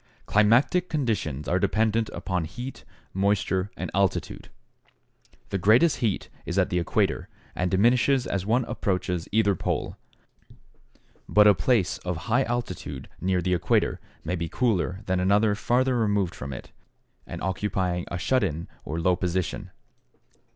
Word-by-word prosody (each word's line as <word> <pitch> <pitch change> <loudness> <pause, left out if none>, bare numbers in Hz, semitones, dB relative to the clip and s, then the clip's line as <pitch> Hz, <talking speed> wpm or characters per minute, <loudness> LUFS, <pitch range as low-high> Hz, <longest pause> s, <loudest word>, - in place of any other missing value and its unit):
= - - -34
Climatic 125 - +3
conditions 105 - -2
are 90 - +2
dependent 110 +3 +1
upon 90 -4 -3
heat, 120 +10 -8 0.3
moisture, 95 0 +1
and - - -4
altitude. 100 -1 -1 1.0
The 100 - -1
greatest 120 - +4
heat 110 -5 -1 0.2
is 85 - -4
at 95 - +2
the 90 - +1
equator 85 - 0 0.2
and 90 0 -1
diminishes 120 +7 +3
as 100 -2 -2
one 115 +5 +1
approaches 90 -3 -2
either 105 -1 +3
pole, 90 - -3 1.3
but 105 0 +6
a 105 - +8
place 95 +2 +1
of 90 -2 -3
high 125 +3 +3
altitude 90 - -4
near 90 -1 +1
the 90 - +1
equator 85 - +1 0.2
may 90 +3 -2
be 85 -2 -3
cooler 100 -6 0
than 95 0 0
another 100 +3 +3
farther 125 +5 +1
removed 105 -6 +1
from 70 +2 -7
it 65 - -8 0.6
and - - -6
occupying 95 -2 -1
a 85 - -3
shut 130 +7 +1
in 85 -3 -2 0.2
or 80 +3 -4
low 90 +2 +3
position. 90 -1 -2
100 Hz, 145 wpm, -26 LUFS, 90-115 Hz, 1.3 s, a